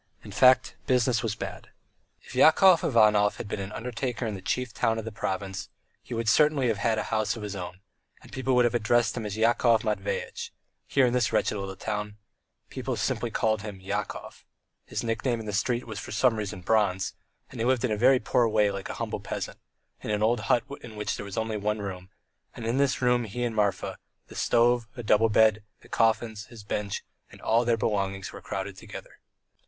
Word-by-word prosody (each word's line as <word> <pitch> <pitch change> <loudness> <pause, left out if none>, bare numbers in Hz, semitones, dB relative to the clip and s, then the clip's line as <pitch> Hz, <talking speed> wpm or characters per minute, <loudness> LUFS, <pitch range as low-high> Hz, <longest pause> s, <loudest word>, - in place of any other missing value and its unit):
In - - -10
fact 130 0 +4
business 125 -2 +2
was 115 -2 -2
bad. - - -7 0.5
If - - -13
Yakov 180 +2 +6
Ivanov 105 -5 +4
had - - -6
been 100 - -4
an 95 +1 -5
undertaker 120 +1 -3
in 110 - -2
the 95 - -7
chief 125 +1 -2
town 115 0 +1
of 110 - -4
the 115 - -5
province 95 -2 -4 0.3
he 120 - -7
would 115 0 -2
certainly 140 +1 +4
have 110 -3 -1
had 110 +2 +1
a - - 0
house 110 +1 +1
of 110 - -7
his 105 -1 -5
own, 90 0 -7 0.4
and - - -16
people 130 -1 0
would 125 -1 +5
have 120 - +1
addressed 120 -1 +2
him 115 -3 -3
as 105 +1 -5
Yakov 115 0 +3
Matveyitch; 105 -3 -3 0.4
here 135 -2 +3
in 120 - +1
this 125 -2 +2
wretched - - +1
little 100 -1 -5
town 105 +1 -4 0.5
people - - -3
called 110 -2 0
him 105 -1 -6
simply 95 0 -16
Yakov; 100 0 -4 0.4
his - - -3
nickname 115 +1 -1
in 110 - -7
the 105 - -4
street 120 +4 0
was 110 -2 -6
for - - -8
some 115 +2 +3
reason 100 -4 -4
Bronze, 95 -2 +1 0.4
and 125 - -9
he - - +1
lived 130 -1 +2
in 120 - -1
a 125 +5 +4
poor 120 +2 +2
way 105 -2 +3
like 100 -1 -6
a - - -4
humble - - -3
peasant, - - -5 0.4
in - - -6
a - - +1
little 105 +1 +2
old 120 0 +1
hut 115 +2 +2 0.2
in 110 -2 -10
which 105 -1 -2
there - - -6
was 100 - -7
only 110 -1 -1
one 105 +1 -1
room, 95 -3 -6 0.5
and 115 - -7
in 115 +3 0
this 140 -2 +1
room 125 -1 +3
he 120 +4 -4
and 120 -2 -2
Marfa, 100 -3 0 0.3
the - - -12
stove, 120 0 +3
a 120 - -5
double 110 +1 +4
bed, 110 0 +4 0.2
the - - -17
coffins, 110 -1 +1
his 115 -3 -12
bench, 100 0 -3 0.3
and - - -14
all 115 +2 +2
their 120 -1 +2
belongings 95 -3 -2
were - - -9
crowded 100 0 -5
together. - - -11
110 Hz, 210 wpm, -27 LUFS, 105-120 Hz, 0.5 s, Yakov